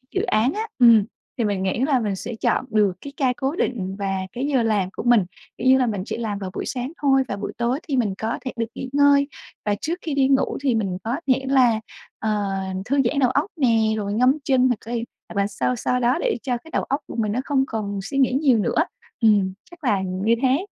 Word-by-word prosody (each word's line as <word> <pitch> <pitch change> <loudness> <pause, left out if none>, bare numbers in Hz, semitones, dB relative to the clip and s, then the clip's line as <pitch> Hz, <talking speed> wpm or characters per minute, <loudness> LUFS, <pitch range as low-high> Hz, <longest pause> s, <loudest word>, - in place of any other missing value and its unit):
dự 380 - +2
án 245 - +2
á. 440 +1 -3
Ừm, 230 -4 +7 0.3
thì 235 - 0
mình 200 -3 -1
nghĩ 190 +4 -1
là 265 -1 +2
mình 210 -4 -1
sẽ 230 +4 -6
chọn 240 - 0
được 210 -4 +2
cái 280 - -9
ca 260 -3 +2
cố 275 +4 -1
định 195 - -2
và 195 -1 -1 0.2
cái 250 +3 -2
giờ 265 -5 +2
làm 210 -4 +1
của - - -6
mình. 240 -6 +4 0.3
Kiểu 255 - -1
như 265 - +7
là, 255 - +2
mình 205 -4 -2
chỉ - - -4
làm 215 -4 -3
vào 190 -2 -4
buổi - - -4
sáng 255 +2 -3
thôi 270 -2 +4
và 200 - -3
buổi 200 - -5
tối 240 +4 0
thì 270 -3 0
mình 215 -5 +1
có 220 +1 -2
thể 255 - -2
được 230 - 0
nghỉ 260 - -5
ngơi, 285 0 +5 0.4
và 205 -1 +1
trước 330 +3 -1
khi 315 - -3
đi 275 -1 +3
ngủ 270 0 +2
thì 260 -4 +2
mình 195 -5 -1
có 230 +3 -1 0.2
thể 265 +1 -4
là, 245 -5 +4 0.4
ờ, 210 -2 -1 0.3
thư 280 +3 0
giãn 280 +4 +1
đầu 255 -3 +4
óc 285 - +1
nè, 240 -7 +3 0.2
rồi 205 -1 -2
ngâm 255 +6 +3
chân 255 -1 +3
hoặc 245 - +1
cay, 235 0 -3 0.2
hoặc 200 - -1
là 200 - +1
sao 250 - -1
sao 250 +2 0
đó 245 +1 +2
để - - 0
cho 250 -3 -1
cái 320 +7 -16
đầu - - 0
óc 275 +2 -1
của - - -8
mình 215 -3 0
nó 240 - -1
không 275 -2 +2
còn 205 -3 -3
suy 195 +8 -5
nghĩ 260 -2 +3
nhiều 270 -3 +3
nữa. - - +2 0.4
Ừm, 205 -4 +4 0.2
chắc 345 -2 -15
là 205 -7 +2
như 190 +5 0
thế. 270 +8 +2
240 Hz, 250 wpm, -23 LUFS, 210-270 Hz, 0.4 s, Ừm